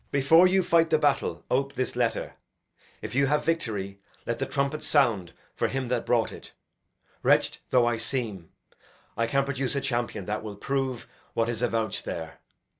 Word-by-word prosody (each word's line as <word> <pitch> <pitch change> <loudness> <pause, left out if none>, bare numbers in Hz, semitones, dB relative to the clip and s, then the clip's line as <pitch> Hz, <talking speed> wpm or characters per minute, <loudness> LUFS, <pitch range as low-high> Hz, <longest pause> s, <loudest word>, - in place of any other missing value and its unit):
Before 160 +6 +6
you 190 +1 +3
fight 165 -2 +3
the 155 - +4
battle, 145 -2 0
ope 135 +2 +1
this 130 - -2
letter. 115 -3 -1 0.7
If - - -5
you 140 +2 +3
have 150 +1 +1
victory, 100 -12 -2 0.3
let 115 0 -2
the 135 - -1
trumpet 140 +2 -1
sound 115 - +2 0.2
For - - +1
him 135 -2 -3
that 125 -2 -1
brought 120 -2 +2
it. - - -11 0.7
Wretched - - +3
though 125 -2 +4
I 120 -1 +1
seem, 110 -7 -3 0.7
I 115 +1 0
can 135 +4 +1
produce 140 0 -2
a - - +2
champion 120 -7 -2
that 105 +2 -2
will 105 -2 -7
prove 135 +2 -2 0.3
What 115 0 +1
is 120 -1 -2
avouched 115 -2 -1
there. 80 -1 -6
125 Hz, 175 wpm, -27 LUFS, 115-140 Hz, 0.7 s, Before